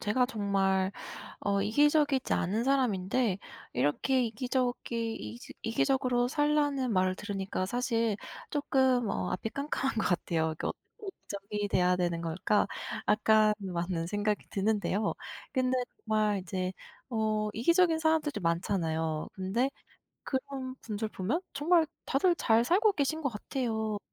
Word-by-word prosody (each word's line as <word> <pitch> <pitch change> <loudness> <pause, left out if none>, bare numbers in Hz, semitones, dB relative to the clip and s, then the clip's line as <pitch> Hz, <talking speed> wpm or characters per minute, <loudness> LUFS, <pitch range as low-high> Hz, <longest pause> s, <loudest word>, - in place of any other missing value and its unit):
제가 245 +4 +2
정말 195 -4 +1 0.5
어 200 -1 +1
이기적이지 290 +3 +3
않은 215 +7 0
사람인데 235 -5 +1 0.3
이렇게 145 - +2
이기적이 235 -1 -1
이지 110 +3 -8
"이기적으로 245 +1 +1
살라."는 290 -4 +1
말을 185 -1 +2
들으니까 195 -2 -3
사실 230 -1 0 0.3
쪼끔 260 -5 +2
어 90 -1 -1
앞이 225 - -2
깜깜한 275 -2 -2
것 220 - +1
같아요. 160 -2 +1
이거 155 - -3 0.2
'왜 415 - -8
이기적이 205 - -5
돼야 180 -1 +3
되는 175 -2 0
걸까?' 170 +5 +1 0.4
약간 215 0 +5
많은 175 -2 -2
생각이 205 +2 -1
드는데요. 205 0 0 0.4
근데 255 -1 +2 0.3
정말 215 -2 +1
이제 185 +1 -3 0.3
어 215 -2 0
이기적인 335 - +4
사람들도 315 - +1
많잖아요. 165 -2 0
근데 215 +8 0 0.5
그런 265 -1 -3
분들 215 -1 -3
보면 215 - -1
정말 325 +1 +3 0.2
다들 345 +6 +3
잘 230 -3 +3
살고 405 - +4
계신 315 +2 0
것 275 - +1
같아요. 220 -1 -2
220 Hz, 290 characters per minute, -30 LUFS, 195-265 Hz, 0.5 s, 약간